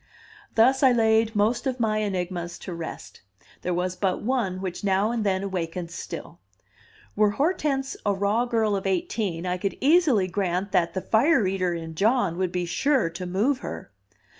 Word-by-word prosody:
Thus 255 +4 +4
I 265 -2 +6
laid 225 -1 +3
most 230 +6 +1
of 255 -1 -2
my 215 -2 +1
enigmas 180 -3 -3
to 180 - -5
rest; 165 -1 -8 0.4
there 180 - -2
was 180 +1 -1
but 185 0 -1
one 225 -6 -1
which 185 -1 -5
now 200 +2 +2
and 235 -2 -1
then 190 -1 0
awakened 175 -3 -4
still. 175 - -7 0.8
Were 210 0 +4
Hortense 280 -4 0
a 205 - +2
raw 200 +4 +1
girl 225 -4 +1
of 195 0 -2
eighteen, 185 -1 -1
I 180 0 -1
could 195 +1 -2
easily 280 - +4
grant 185 +1 -1
that 170 +1 +1
the 185 - -1
"fire 230 - +3
eater" 185 -2 0
in 165 -1 -6
John 200 -1 +1
would 185 -2 0
be 180 -1 -1
sure 255 - +1
to 180 +2 -6
move 220 +10 +1
her. - - -7
200 Hz, 175 wpm, -25 LUFS, 180-230 Hz, 0.8 s, I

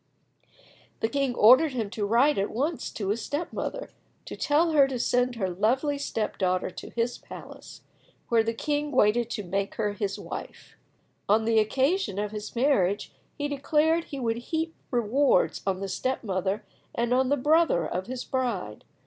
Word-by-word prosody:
The 225 - +1
king 275 -2 0
ordered 255 +8 +6
him 220 -5 -3
to 210 -2 -2
write 245 +5 +3
at 200 - 0
once 290 +7 -2
to 200 -3 -3
his 220 +3 0
step 300 +4 -4
mother, - - -4 0.3
to - - -7
tell 320 +3 +2
her 285 -3 +5
to 265 -2 -3
send 245 +1 +1
her 200 -5 -1
lovely 250 - 0
step 225 -6 -3
daughter 185 -1 0
to - - -9
his 235 +1 -2
palace, - - -11 0.5
where 230 -1 +3
the 230 0 -2
king 295 +3 -1
waited 235 -1 +3
to 215 -3 -4
make 195 +2 -2
her 210 -2 -1
his 200 -1 -3
wife. - - -8 0.5
On 220 +2 +4
the 225 -1 +4
occasion 265 - +1
of 205 0 -2
his 210 +1 -7
marriage 205 -7 +1 0.2
he 290 -1 -1
declared 305 +3 +1
he 280 - -7
would 230 -2 -1
heap 320 +6 -3 0.2
rewards 250 +4 +2
on 190 -1 0
the 195 - -2
step 255 +9 -2
mother 195 +1 -2 0.3
and 235 +1 0
on 260 0 +2
the 285 - +2
brother 300 - +3
of 185 +5 -3
his 255 0 -4
bride. 235 - -3
240 Hz, 175 wpm, -27 LUFS, 205-285 Hz, 0.5 s, ordered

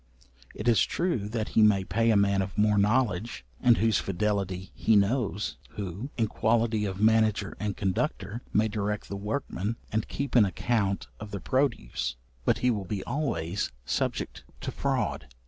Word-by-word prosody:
It 105 - -5
is 115 -5 +5
true 150 - -1
that 110 -1 -2
he - - +3
may 105 -3 +5
pay 115 +6 +1
a 110 - +5
man 100 -1 +3
of 95 +1 -5
more 105 0 +4
knowledge, 110 -1 +1
and 120 -2 +5
whose 110 -4 +3
fidelity 95 -1 -1
he 110 - +2
knows, 105 -1 +1 0.2
who, 100 - -5
in 115 - +3
quality 110 0 +1
of 95 -1 -4
manager 110 -2 +3
and 105 -2 -2
conductor, 100 +3 -1
may 110 +1 +3
direct 105 -1 -3
the 100 - -4
workmen, 105 0 -3 0.2
and 110 0 0
keep 140 0 -4
an 120 - +7
account 100 +1 0
of 105 - -7
the 100 -1 -4
produce; 120 - 0 0.3
but - - +3
he 125 - +5
will 105 -4 -2
be 100 +1 -3
always 100 - -2
subject - - -2 0.2
to - - -3
fraud. - - -1
105 Hz, 165 wpm, -28 LUFS, 100-115 Hz, 0.3 s, an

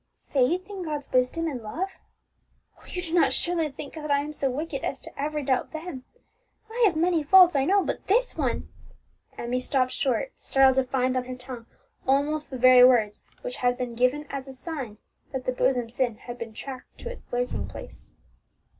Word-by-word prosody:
"Faith 325 +8 +2
in 400 -2 -6
God's 300 -4 -4
wisdom 255 +6 +2
and 275 -7 -3
love! 325 - -3 0.9
Oh, - - -19
you 360 - -4
do 330 -2 -6
not 345 - +4
surely 335 -3 +1
think 280 +1 -8
that 305 -2 -6
I 285 0 +3
am 300 +1 -6
so 275 -2 0
wicked 280 +1 -4
as 270 - -4
ever 300 +1 -2
to - - -7
doubt 260 +2 0
them! 315 -5 -6 0.7
I 480 +2 -3
have 350 - 0
many 335 0 +2
faults, 355 +2 +7
I 270 -1 +3
know, 390 +4 +4
but - - -4
this 485 +6 +3
one - - -1 0.3
" - - -35
Emmie 245 +1 -1
stopped 255 0 +1
short, 280 - 0
startled 265 -1 +4
to 265 - +3
find 255 -1 +1
on 255 -1 0
her 255 0 -6
tongue 250 -2 -9 0.4
almost 290 +3 +1
the 265 - -5
very 250 0 +8
words 230 -5 +4 0.2
which - - -5
had 245 0 +1
been 250 -2 -3
given 255 +5 +1
as 275 -1 -5
a 270 - -8
sign 260 -6 -6 0.4
that 260 -1 -3
the - - +1
bosom 250 -1 +1
sin 240 -1 -1
had 240 +2 -9
been 230 -1 -6
tracked 260 0 -9
to 485 - -5
its - - -13
lurking 245 0 -2
place. - - -9
270 Hz, 200 wpm, -26 LUFS, 250-320 Hz, 0.9 s, very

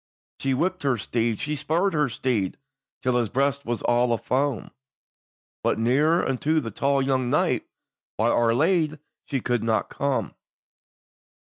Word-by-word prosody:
She 135 -1 0
whipped 185 +5 -1
her 135 -4 +1
steed, 115 +1 -1
she 150 +7 -2
spurred 170 +6 0
her 150 -3 +2
steed, 115 -5 -1 0.5
Till 125 -1 +2
his 120 -3 0
breast 140 +3 0
was 120 -1 -2
all 120 0 +2
a - - +1
foam; 135 +2 -1 0.9
But - - +1
nearer 145 +9 +2
unto 150 +5 +1
that 115 -8 -6
tall 140 0 +2
young 130 -2 0
knight, - - +1 0.5
By 110 +2 +2
Our 115 -1 +3
Ladye 160 +1 +2 0.3
she 135 -4 -2
could 120 -2 0
not 110 -1 0
come. 140 -1 -1
130 Hz, 150 wpm, -25 LUFS, 120-150 Hz, 0.9 s, Our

